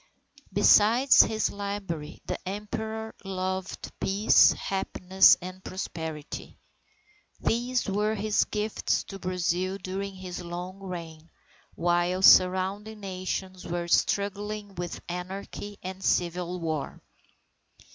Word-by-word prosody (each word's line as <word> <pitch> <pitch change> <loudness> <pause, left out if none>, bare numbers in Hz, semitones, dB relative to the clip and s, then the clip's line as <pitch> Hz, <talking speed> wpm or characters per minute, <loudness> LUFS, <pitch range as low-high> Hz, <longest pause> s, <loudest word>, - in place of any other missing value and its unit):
Besides 215 +6 +6
his 220 -1 +1
library 200 -7 -5
the - - -3
Emperor 220 +2 -5
loved 190 0 -4
peace, 200 +3 +5
happiness, 190 -1 +3
and 185 +1 -8
prosperity. 160 -5 -6 0.8
These 245 +2 0
were 210 +2 0
his 210 0 +1
gifts 210 0 -1
to 195 - -9
Brazil 185 +1 -1
during 195 +1 -5
his 185 -1 -7
long 180 +2 -6
reign, 170 -4 -8 0.5
while 175 +2 +1
surrounding 190 +4 +5
Nations 185 -1 -4
were 175 0 -3
struggling 205 +3 0
with 175 -2 -5
anarchy 190 +3 -6
and 190 +1 -6
civil 175 +1 0
war. 160 -4 -3
190 Hz, 100 wpm, -27 LUFS, 180-205 Hz, 0.8 s, Besides